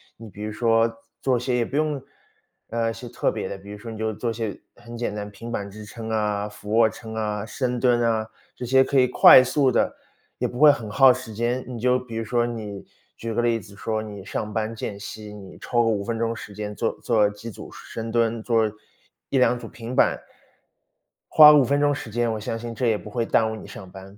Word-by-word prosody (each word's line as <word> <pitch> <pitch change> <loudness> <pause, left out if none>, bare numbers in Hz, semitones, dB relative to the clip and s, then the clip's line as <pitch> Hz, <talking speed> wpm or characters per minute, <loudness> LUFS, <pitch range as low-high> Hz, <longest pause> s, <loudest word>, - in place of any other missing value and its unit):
你 115 -1 -11
比 105 +1 -9
如 105 0 -4
说 115 0 +2 0.3
做 130 -2 +2
些 125 +1 -1
也 120 - +1
不 135 - -7
用 150 -2 0 0.7
呃， 115 0 0
一 115 - -3
些 115 +1 -9
特 125 - 0
别 - - -4
的， - - -5
比 100 +1 -12
如 105 - -7
说 115 +3 -8
你 110 - -7
就 110 0 -2
做 115 +3 -3
一 - - -4
些 110 -3 -4 0.2
很 120 0 -10
简 120 -3 -2
单， 105 0 -5
平 115 +3 -9
板 100 -3 -3
支 105 +2 -10
撑 110 +1 -8
啊、 105 -2 0
俯 105 0 -10
卧 115 -1 +5
撑 110 0 -9
啊、 105 -1 -2
深 125 +3 -2
蹲 120 -1 +3
啊， 115 -2 +1 0.3
这 125 - -6
些 130 +2 +5
可 140 - 0
以 125 - +5
快 130 +1 +8
速 135 +1 +2
地 - - +1 0.5
也 - - +1
不 120 - -8
会 150 +2 +8
很 115 -6 -5
耗 130 +4 +6
时 125 -3 -8
间。 120 +3 -1
你 125 -2 -6
就 125 +2 +2
比 125 -3 -9
如 115 - -2
说 120 +2 +1
你 105 -4 -6 0.3
举 115 0 -5
个 120 +2 0
例 115 -1 +2
子 100 0 -14
说， 110 +2 -2
你 100 -3 -8
上 105 +1 -4
班 110 +1 -2
间 105 -2 -5
隙， 105 +1 -8
你 95 -2 -11
抽 120 -1 +1
个 115 - +1
5 105 -3 0
分 115 +2 -3
钟 115 0 -1
时 110 -1 -9
间 105 0 -5
做 115 - -1
做 105 -3 +2
几 105 +3 -9
组 - - -11
深 115 0 -7
蹲， 115 -1 +1
做 115 -1 +2 0.6
1-2 125 -2 +3
组 115 - -8
平 115 +2 -8
板， - - +3 1.1
花 150 -1 +9
5 145 -2 +6
分 140 +3 +1
钟 145 0 +3
时 135 -5 -6
间， 120 +1 0
我 110 - -4
相 110 +2 -4
信 115 0 -6
这 120 +2 -1
也 110 - +2
不 - - -12
会 115 +3 -2
耽 110 -1 +2
误 - - -4
你 110 - -10
上 95 - -10
班。 95 +1 -12
115 Hz, 255 characters per minute, -24 LUFS, 105-120 Hz, 1.1 s, 花